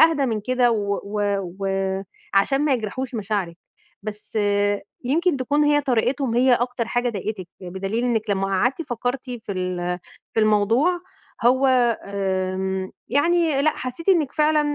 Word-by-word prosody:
أهدى 320 Hz, -4 st, +5 dB
من 220 Hz, -3 st, -1 dB
كده، 250 Hz, +2 st, +2 dB
و 200 Hz, -2 st, 0 dB
و 205 Hz, +1 st, -2 dB, 1.1 s
وعشان 270 Hz, +8 st, +3 dB
ما 290 Hz, -, +3 dB
يجرَحوش 250 Hz, +3 st, -4 dB
مشاعرِك. 200 Hz, -5 st, -2 dB, 0.5 s
بس 215 Hz, +1 st, -5 dB, 0.7 s
يمكن 320 Hz, +4 st, +2 dB
تكون 290 Hz, +3 st, +1 dB
هي 295 Hz, 0 st, +4 dB
طريقتهم 255 Hz, -1 st, 0 dB
هي 250 Hz, +1 st, +5 dB
أكتر 245 Hz, -1 st, -1 dB
حاجة 245 Hz, 0 st, +1 dB
ضايقَتِك، 195 Hz, -3 st, -4 dB
بدليل 195 Hz, +6 st, -3 dB
إنَّك 225 Hz, -3 st, 0 dB
لمّا 195 Hz, 0 st, +1 dB
قعدتِ 240 Hz, -, +1 dB
فكَّرتِ 250 Hz, -1 st, -3 dB
في 225 Hz, -4 st, -5 dB
ال 180 Hz, -1 st, -2 dB, 0.4 s
في 225 Hz, -, +3 dB
الموضوع، 225 Hz, -, +3 dB, 0.4 s
هو 260 Hz, +3 st, +5 dB, 0.4 s
آمم، 190 Hz, -1 st, -2 dB, 0.2 s
يعني 305 Hz, +2 st, +2 dB
لأ، 310 Hz, -, +3 dB
حسِّيتِ 255 Hz, +8 st, -6 dB
إنَّك 325 Hz, -8 st, +3 dB
فعلًا 305 Hz, 0 st, +3 dB
240 Hz, 140 wpm, -23 LUFS, 200-275 Hz, 1.1 s, أهدى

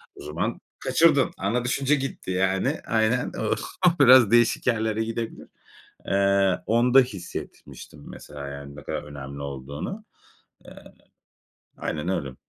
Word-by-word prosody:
O -, -, -12 dB
zaman 75 Hz, +3 st, -3 dB, 0.2 s
kaçırdın. 155 Hz, -5 st, +3 dB
Ana 120 Hz, +5 st, -1 dB
düşünce 135 Hz, +3 st, +1 dB
gitti 135 Hz, -8 st, -5 dB
yani. 95 Hz, -, 0 dB
Aynen. 115 Hz, +2 st, +1 dB, 0.6 s
O -, -, +9 dB
biraz 125 Hz, -4 st, +7 dB
değişik 120 Hz, +1 st, +3 dB
yerlere 110 Hz, -2 st, +1 dB
gidebilir. 115 Hz, 0 st, -5 dB, 0.6 s
Eee, 100 Hz, -1 st, +2 dB
onda 120 Hz, +3 st, +5 dB
hissetmiştim 95 Hz, -, -7 dB
mesela, 70 Hz, -1 st, -9 dB
yani, 70 Hz, 0 st, -9 dB
ne 75 Hz, -, -10 dB
kadar -, -, -4 dB
önemli 70 Hz, -1 st, -8 dB
olduğunu. 70 Hz, -, -6 dB, 0.6 s
Eee, -, -, -14 dB, 0.9 s
aynen 80 Hz, +3 st, -3 dB
öyle. 70 Hz, -8 st, -3 dB
100 Hz, 120 wpm, -25 LUFS, 75-125 Hz, 0.9 s, O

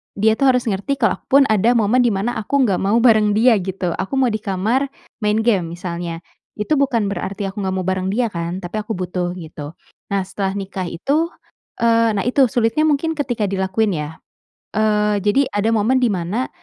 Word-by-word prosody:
dia 220 Hz, +2 st, +3 dB
tuh 275 Hz, -, +4 dB
harus 250 Hz, -2 st, +3 dB
ngerti 220 Hz, +6 st, -1 dB
kalau 225 Hz, -8 st, 0 dB
aku -, -, -43 dB
pun -, -, +6 dB
ada 220 Hz, +4 st, +3 dB
momen 230 Hz, +2 st, +3 dB
di 245 Hz, -, +4 dB
mana 220 Hz, +2 st, -1 dB
aku 270 Hz, +6 st, +1 dB
enggak 200 Hz, -7 st, +1 dB
mau 200 Hz, +3 st, +1 dB
bareng 215 Hz, -4 st, +4 dB
dia, 230 Hz, +2 st, +5 dB
gitu. 185 Hz, -1 st, -3 dB
Aku 195 Hz, -, -4 dB
mau 260 Hz, -3 st, +2 dB
di 215 Hz, -, -2 dB
kamar 215 Hz, +7 st, 0 dB, 0.3 s
main 210 Hz, -1 st, +1 dB
game, 190 Hz, -8 st, +1 dB
misalnya. 170 Hz, -1 st, -5 dB, 0.4 s
Itu 210 Hz, +9 st, 0 dB
bukan 240 Hz, -7 st, +1 dB
berarti 200 Hz, 0 st, -4 dB
aku 205 Hz, -, -8 dB
enggak 190 Hz, 0 st, -1 dB
mau 185 Hz, -, -2 dB
bareng 185 Hz, 0 st, -1 dB
dia 235 Hz, +3 st, +1 dB
kan, 170 Hz, +1 st, -4 dB
tapi 180 Hz, +5 st, -4 dB
aku 210 Hz, -, -7 dB
butuh, 180 Hz, -1 st, -3 dB
gitu. 155 Hz, -3 st, -8 dB, 0.4 s
Nah, 200 Hz, -1 st, +1 dB
setelah 195 Hz, 0 st, -2 dB
nikah 190 Hz, -2 st, -5 dB
itu, 300 Hz, -, 0 dB, 0.5 s
eee, 230 Hz, -1 st, +3 dB
nah 200 Hz, -, 0 dB
itu 270 Hz, +2 st, +4 dB
sulitnya 235 Hz, +5 st, +1 dB
mungkin 305 Hz, +2 st, +1 dB
ketika 250 Hz, -7 st, -2 dB
dilakuin 195 Hz, +2 st, 0 dB
ya. 150 Hz, +1 st, -5 dB, 0.6 s
Eee, 210 Hz, -1 st, +2 dB
jadi 270 Hz, +7 st, +3 dB
ada 205 Hz, +2 st, +1 dB
momen 225 Hz, +4 st, +2 dB
dimana 210 Hz, +1 st, -1 dB
210 Hz, 195 wpm, -19 LUFS, 190-240 Hz, 0.6 s, pun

